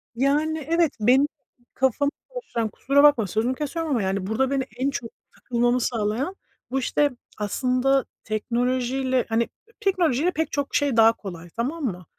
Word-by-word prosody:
Yani, 295 +3 +1
evet, 335 -2 +3
benim 255 +6 +4 0.5
kafamı 265 +2 +1 0.2
karıştıran: 245 - -3
kusura 280 +6 +2
bakma, 270 -8 +5
sözünü 225 +7 0
kesiyorum 310 +3 -3
ama 240 -6 +2
yani, 190 0 -1
burada 260 +6 0
beni 275 -1 +1
en 265 +3 +1
çok 240 -4 -4 0.3
takılmamı 240 0 +1
sağlayan, 230 - -1 0.4
bu 270 - +1
işte 290 +3 +1 0.3
aslında 255 +5 +1 0.2
teknolojiyle 250 +3 0
hani, 225 +1 +1 0.3
teknolojiyle 360 - +2
pek 320 -2 -2
çok 285 -1 -2
şey 280 -5 +2
daha 225 0 +7
kolay 175 -6 -9
tamam 265 - -3
mı? 180 -6 -4
255 Hz, 150 wpm, -24 LUFS, 230-285 Hz, 0.5 s, daha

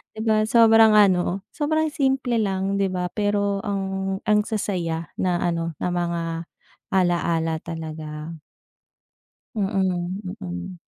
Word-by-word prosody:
'di - - -8
ba 215 -1 +2
sobrang 225 -1 +6
ano, 190 -2 +3
sobrang 315 +1 0
simple 265 -5 +1
lang 195 -1 0
'di 195 - +2
ba, 180 -1 -3
pero 205 -1 0
ang 195 -2 -2
ang 210 0 +3
sasaya 175 -7 -2
na 180 -2 +1
ano, 165 -2 -1
na 180 - 0
mga 170 -1 -1 0.7
alaala 170 -3 +1
talaga. 155 -1 -7 1.2
Mm, 190 -3 -1 0.2
mm. 180 0 -6
190 Hz, 115 wpm, -23 LUFS, 175-210 Hz, 1.2 s, sobrang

